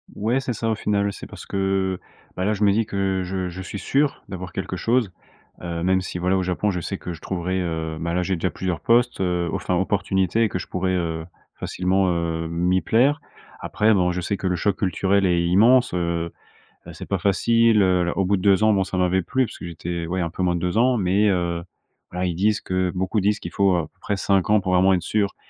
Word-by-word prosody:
Ouais 115 +6 0
c'est 125 - -3
ça 115 0 -2
au 110 - +1
final, 100 -1 0
oui. 100 - -1
C'est - - -9
parce - - -11
que, 95 -1 -1 0.4
bah, 90 - -2
là 105 - +2
je 105 0 -2
me 100 - +5
dis 110 +2 +1
que 95 -2 -1
je 95 0 -3
je 90 +2 -7
suis 100 +2 -6
sûr 140 +8 0
d'avoir 90 -2 -7
quelque 95 +1 -4
chose, 115 +1 +1 0.5
heu 85 -1 -4
même 95 +1 +2
si 90 -1 -5
voilà 90 +2 +1
au 95 - 0
Japon 90 +3 0
je 90 -2 -3
sais 100 - -4
que 90 - -6
je 80 - -11
trouverai, 95 0 -2
heu, 80 -2 -3
ben, 85 +1 -2
là 90 - +1
j'ai 95 +1 -1
déjà 90 +2 -1
plusieurs 90 -1 -3
postes, 120 -2 +2
heu, 90 -2 0
enfin 90 - -1
opportunités 95 +2 +1
et 110 - +2
que 90 - -3
je - - -7
pourrai, 95 0 -1
heu, 80 -2 -2 0.3
facilement, 95 +1 0
heu, 85 -1 -2
m'y 90 +2 +1
plaire. 135 - +2 0.4
Après 110 +2 +2
bon 90 -3 +2
je 90 - -3
sais 95 +3 -2
que 95 - -3
le 90 -1 0
choc 100 +2 0
culturel 95 +1 +1
est 90 -2 +2
immense, 115 +8 +4
heu 85 -1 -1 0.6
heu, - - -9
c'est - - -8
pas 100 - 0
facile, 110 +3 +3
heu, 90 -2 +3
l - - +1
au 95 - +1
bout 100 +2 +2
de - - -5
2 100 +2 +4
ans 110 - +5
bon 95 -1 +1
ça 95 - -5
m'avait 90 +1 +2
plu 130 +8 0
parce - - -10
que - - -8
j'étais 85 0 -5
ouais 90 +2 -1
un 85 - -1
peu 95 - -4
moins 90 -1 +1
de 85 - -3
2 90 +3 -1
ans 125 +2 +4
mais, 100 +1 +2
heu, 85 -3 0 0.5
voilà 90 +1 -2
ils 85 - -2
disent 105 +3 +1
que 95 -1 -1
beaucoup 95 +4 0
disent 105 +1 +1
qu'il 85 - -7
faut, 100 -2 +2
heu, - - +2
à - - +1
peu 95 - -38
près 105 - -2
5 95 0 +1
ans 105 -1 +4
pour 95 -1 -1
vraiment 95 +1 +5
être 90 - +1
sûr 100 +1 -1
95 Hz, 255 wpm, -23 LUFS, 90-100 Hz, 0.6 s, me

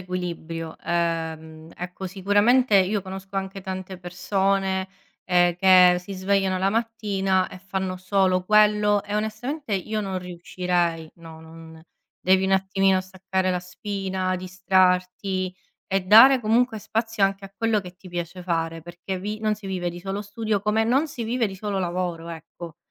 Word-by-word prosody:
equilibrio. 170 -3 -5
Ehm, 160 -2 -3
ecco, 180 +2 -6
sicuramente 205 +5 +3
io 195 +2 +2
conosco 190 +1 -8
anche 195 0 -4
tante 185 0 -6
persone, 190 +1 -1 0.4
ehm, 175 -1 +3
che 180 -1 +6
si 190 +2 -9
svegliano 190 0 +1
la 190 +1 +1
mattina 200 -4 0
e - - -11
fanno 190 0 -3
solo 185 -1 +1
quello, 210 0 +4
e 205 - -5
onestamente 220 +6 -3
io 215 +3 -2
non 190 -2 -3
riuscirei. 175 -2 -2
No, 165 -1 -12
non 160 0 -13 0.4
devi 190 +1 +4
un 190 - +1
attimino 190 0 +2
staccare 190 0 -2
la 180 - -1
spina, 190 0 -3
distrarti 185 0 0 0.3
e 195 +1 +1
dare 230 +7 +8
comunque 225 +1 +2
spazio 225 0 -2
anche 195 0 -1
a 195 - -11
quello 225 -1 +1
che 180 -2 -11
ti 185 0 -13
piace 175 +1 -5
fare, 165 -2 -2
perché 175 +3 -6
vi 210 +2 -4
non 215 -1 +1
si 210 -1 -11
vive 180 -2 -2
di 175 +1 -9
solo 195 +2 -4
studio, 210 0 -2
come 210 +2 +1
non 270 +7 +2
si 250 -4 -6
vive 235 +1 0
di 195 - -7
solo 205 0 -3
lavoro, 175 -2 -3
ecco. 165 0 -9
190 Hz, 155 wpm, -24 LUFS, 180-205 Hz, 0.4 s, dare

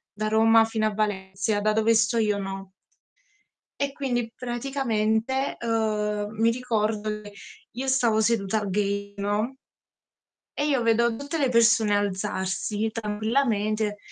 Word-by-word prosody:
da 215 0 -2
Roma 225 +1 +5
fino 220 -1 0
a 215 - -2
Valencia, 205 0 -1
da 215 +1 +2
dove 220 +1 +3
sto 225 +1 +2
io 210 -2 +1
no. 195 -1 -6 1.1
E 280 -1 0
quindi 245 -5 -2
praticamente, 240 0 -1
uhm, 210 -2 -1
mi 230 +1 +4
ricordo 215 -3 -1
che 205 -1 -12 0.4
io 260 +3 -5
stavo 240 -5 +2
seduta 215 -2 +1
al 200 - -4
gate, 200 +1 -1
no 205 +5 -1 1.0
e 290 - +1
io 270 -5 +1
vedo 230 0 +3
tutte 285 +6 -4
le 275 -3 +2
persone 230 -3 +4
alzarsi 200 +2 -2
tranquillamente. 215 -1 0
220 Hz, 130 wpm, -25 LUFS, 210-235 Hz, 1.1 s, Roma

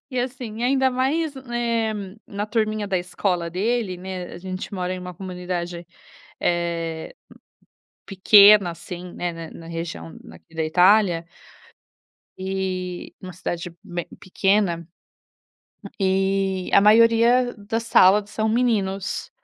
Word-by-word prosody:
e 255 - -3
assim, 245 -3 -4
ainda 265 +1 +2
mais, 280 +4 0
eh, 235 -3 -1 0.3
na 205 +1 -4
turminha 215 -2 -1
da 190 - +1
escola 180 -1 -2
dele, 205 +1 -1
né, 185 -1 -6
a - - -8
gente 185 +2 -6
mora 185 -1 -2
em 185 - -6
uma 180 0 -7
comunidade, 180 -2 -5 0.5
eh, 170 -2 -2 0.9
pequena 200 -1 +6
assim, 175 +1 -8
né, 175 -1 -3
na 165 -1 -8
na 165 - -11
região 160 - -6 0.2
aqui 165 - -18
da 160 -1 -1
Itália, 180 +1 +4 1.1
e 185 -1 -4
uma 185 -1 -8
cidade 170 0 -5
bem 175 -3 -5
pequena, 190 -3 0 1.1
e 190 0 0
a - - +8
maioria 230 +3 +5
das 225 +3 -3
salas 205 -1 +5
são 220 0 -1
meninos. 210 -5 -1
190 Hz, 120 wpm, -23 LUFS, 175-220 Hz, 1.1 s, a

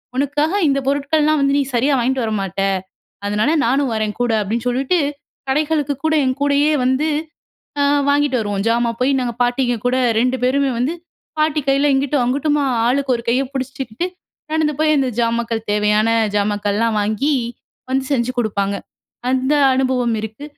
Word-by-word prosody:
உனக்காக 290 +5 0
இந்த 275 0 +2
பொருட்கள்லாம் 295 +2 +2
வந்து 275 0 +2
நீ 285 - +3
சரியாக 270 +4 +2
வாங்கிட்டு 255 +1 0
வரமாட்ட. 195 -3 -2 0.6
அதனால 210 +7 +1
நானும் 265 +1 +1
வரேன் 215 -1 -1
கூட 245 -1 +1
அப்பிடின்னு 225 +4 -2
சொல்லிட்டு, 265 +8 +1 0.5
கடைகளுக்கு 295 0 +1
கூட 315 - +2
என் 255 0 0
கூடயே 285 +1 +3
வந்து 260 +4 +1 0.7
அ - - +3 0.3
வாங்கிட்டு 285 -2 +2
வருவோம். 205 -2 -2
ஜாமான் 235 0 0
போய் 265 +2 +2
நாங்க 240 -2 -2
பாட்டிங்க 245 0 +1
கூட 255 +1 +2 0.2
2 255 +1 +1
பேருமே 275 +1 +2
வந்து 265 +7 0 0.4
பாட்டி 305 0 +2
கையில 280 +1 +3
இங்கிட்டும் 275 0 +1
அங்கிட்டுமா 290 +3 +1 0.2
ஆளுக்கு 270 +1 +1
ஒரு 235 - -8
கைய 250 +3 +2
பிடிச்சுக்கிட்டு 265 +2 -4 0.5
நடந்து 315 -1 +1
போய் 310 -1 +3
அந்த 265 -2 +1
ஜாமாக்கள் 230 -1 0
தேவையான 210 +1 +2 0.3
ஜாமாக்கள்லாம் 205 +2 0
வாங்கி 220 +8 0 0.6
வந்து 265 0 0
செஞ்சு 245 -1 +1
குடுப்பாங்க. 200 -3 -1 0.5
அந்த 260 +2 +1 0.2
அனுபவம் 255 -3 +1
இருக்கு. 220 +6 -7
260 Hz, 150 wpm, -19 LUFS, 230-285 Hz, 0.7 s, நீ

